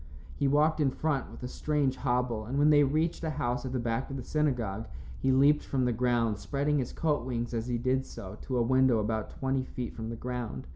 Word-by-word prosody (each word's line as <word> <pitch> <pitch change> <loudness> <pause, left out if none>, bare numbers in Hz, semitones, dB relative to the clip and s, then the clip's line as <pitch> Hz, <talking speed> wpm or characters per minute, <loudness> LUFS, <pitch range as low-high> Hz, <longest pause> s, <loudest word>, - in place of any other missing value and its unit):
He 140 - +1
walked 150 +3 +3
in 145 -3 +3
front 145 -1 -1
with - - -11
a - - -2
strange 145 0 0
hobble, 125 -4 0
and 130 +5 -3
when 150 +1 +5
they 145 -1 +6
reached 155 +5 0
a 160 - 0
house 125 -3 -2
at - - -5
the 130 - -1
back 115 +1 -1
of 135 - -4
the 130 - -5
synagogue, 120 -9 -1 0.3
he 135 - +2
leaped 140 +3 +4
from 130 -2 0
the 125 - +1
ground, 115 -3 +1
spreading 140 +9 0
his 125 - -2
coat 150 -5 0
wings 120 -1 -3
as 115 0 -2
he 120 -1 0
did 130 +2 0
so, 95 +2 -9
to 130 - -2
a 120 - +3
window 130 0 +4
about 110 0 -1
twenty 135 -1 -1
feet 125 -1 -5
from 110 -1 -5
the 115 - -4
ground. 120 - -5
130 Hz, 235 wpm, -30 LUFS, 115-140 Hz, 0.3 s, they